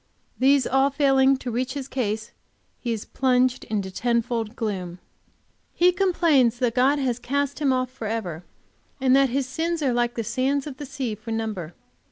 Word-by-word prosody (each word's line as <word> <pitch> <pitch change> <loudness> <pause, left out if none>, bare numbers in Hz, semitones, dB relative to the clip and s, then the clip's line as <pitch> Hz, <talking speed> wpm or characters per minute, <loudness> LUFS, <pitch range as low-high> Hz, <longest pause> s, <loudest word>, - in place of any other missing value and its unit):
These 270 0 +4
all 270 +1 +3
failing 270 -1 +3
to 250 -2 -5
reach 255 +3 -2
his 275 -2 -4
case, 220 -5 -3 0.5
he 240 - -3
is 220 -2 -3
plunged 255 -1 +1
into 200 -3 -3
ten 235 +3 +1
fold 230 -1 -3
gloom. 185 -7 -4 0.8
He 355 +1 +5
complains 335 - +3
that 240 -2 0
God 260 +4 +3
has 250 -4 -1
cast 280 +3 -2
him 285 -3 +2
off 255 -1 0
forever, 220 -9 -4 0.6
and 260 0 +4
that 275 -1 +4
his 270 +2 0
sins 325 +4 -2
are 260 -3 +2
like 240 0 0
the 230 - -2
sands 265 +5 0
of 280 -3 -7
the 290 - -7
sea 265 -4 -3
for 215 +2 -10
number. 215 -7 -3
255 Hz, 180 wpm, -24 LUFS, 225-275 Hz, 0.8 s, He